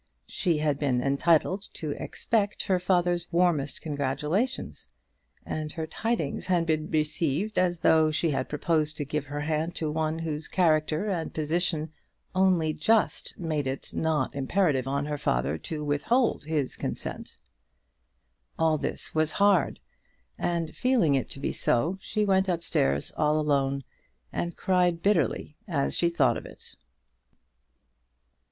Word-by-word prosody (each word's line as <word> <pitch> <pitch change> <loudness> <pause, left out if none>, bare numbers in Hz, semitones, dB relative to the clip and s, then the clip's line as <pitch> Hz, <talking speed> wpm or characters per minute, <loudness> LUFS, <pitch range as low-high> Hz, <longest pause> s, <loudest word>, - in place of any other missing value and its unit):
She 165 - 0
had 150 -2 0
been 130 -4 +1
entitled 160 +7 +2
to 155 -2 -4
expect 210 +6 -1
her 185 -2 +1
father's 175 -1 +1
warmest 170 -5 +1
congratulations, 150 - -2 0.6
and 155 -1 -4
her 160 -1 -3
tidings 185 -2 -2
had 175 -2 +2
been 155 -1 0
received 155 +5 0
as 175 -2 +1
though 160 -1 +5
she 155 +1 0
had 135 -2 -2
proposed 155 0 0
to 145 - -2
give 150 +1 -2
her 145 +1 -4
hand 155 +3 -1
to 155 -2 -2
one 155 0 -1
whose 160 -2 -4
character 155 0 +2
and 175 -5 -2
position 160 0 -1 0.4
only 185 -4 +3
just 220 +9 +1
made 155 -5 -2
it 135 +1 -4
not 155 -5 0
imperative 140 -1 +1
on 140 +1 0
the 150 0 -3
father 70 - 0
to 155 -2 -5
withhold 150 - +1
his 150 -4 -1
consent! - - -5 1.2
All 160 -1 +2
this - - -3
was 155 -1 +1
hard, 200 -2 +3 0.6
and 165 - -2
feeling 250 - +3
it 135 - 0
to - - -7
be - - -2
so, 165 +11 +1
she 210 -1 -1
went 190 -1 +2
up 170 -2 -1
stairs, 70 - 0
all 150 0 +2
alone, 140 -2 +1 0.5
and 170 -1 -3
cried 180 -2 +2
bitterly 165 - +1
as 145 -7 0
she 170 - +2
thought 170 - +2
of - - -8
it. - - -11
160 Hz, 145 wpm, -27 LUFS, 150-175 Hz, 1.2 s, though